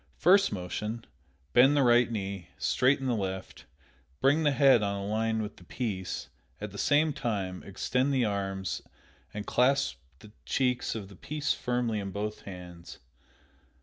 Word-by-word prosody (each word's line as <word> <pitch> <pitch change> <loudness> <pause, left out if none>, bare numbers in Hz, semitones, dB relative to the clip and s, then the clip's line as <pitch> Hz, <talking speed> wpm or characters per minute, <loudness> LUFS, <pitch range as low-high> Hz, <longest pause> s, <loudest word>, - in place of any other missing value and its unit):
First 195 +3 +5
motion: 105 +5 -4 0.5
Bend 135 +4 +6
the 140 - +4
right 120 -1 +4
knee, 100 -4 -4
straighten 135 +1 +2
the 125 - +1
left, 95 -3 -4 0.5
bring 145 +4 +4
the 150 - +4
head 135 -4 +5
on 100 -1 0
a 100 0 -4
line 110 +1 0
with 105 - -7
the - - -15
piece; 95 -2 -4 0.3
at 105 -1 -5
the 100 - -8
same 150 +1 +3
time 100 -8 -3
extend 125 +7 -1
the 130 -3 +2
arms 95 -2 -2 0.5
and 105 0 -6
clasp 125 - +2 0.2
the 105 +8 -15
cheeks 125 -3 0
of 105 -3 -5
the 100 - -14
piece 150 +9 -2
firmly 120 -3 -1
in 100 -1 -4
both 105 +2 -4
hands. 90 -3 -10
110 Hz, 155 wpm, -29 LUFS, 100-130 Hz, 0.5 s, Bend